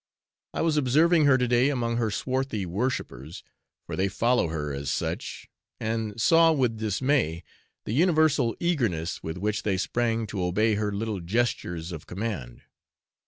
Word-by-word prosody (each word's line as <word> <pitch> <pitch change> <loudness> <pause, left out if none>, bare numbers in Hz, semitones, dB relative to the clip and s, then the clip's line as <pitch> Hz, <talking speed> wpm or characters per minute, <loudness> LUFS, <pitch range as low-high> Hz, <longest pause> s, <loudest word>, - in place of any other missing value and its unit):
I - - 0
was 160 -2 +2
observing 155 +4 +4
her 140 -2 +6
to 125 -1 +1
day 120 +3 +3
among 120 -4 -1
her 115 -2 +1
swarthy 130 -2 -2
worshippers, 85 - -3 0.4
for - - -5
they 95 +1 +1
follow 115 +2 +1
her 75 -3 -3
as 70 0 -4
such, - - -3 0.3
and 110 -1 -3
saw, 165 +7 +5
with 125 -7 0
dismay, 110 - 0 0.4
the 105 - -3
universal 155 -6 +3
eagerness 115 - -1
with 80 +2 -5
which 105 +3 -1
they 100 -3 0
sprang 115 +3 0
to 100 -3 -4
obey 105 +5 +2
her 105 0 -1
little 105 0 -3
gestures 90 -4 -1
of 80 -4 -8
command. 90 - -5
110 Hz, 155 wpm, -26 LUFS, 95-130 Hz, 0.4 s, her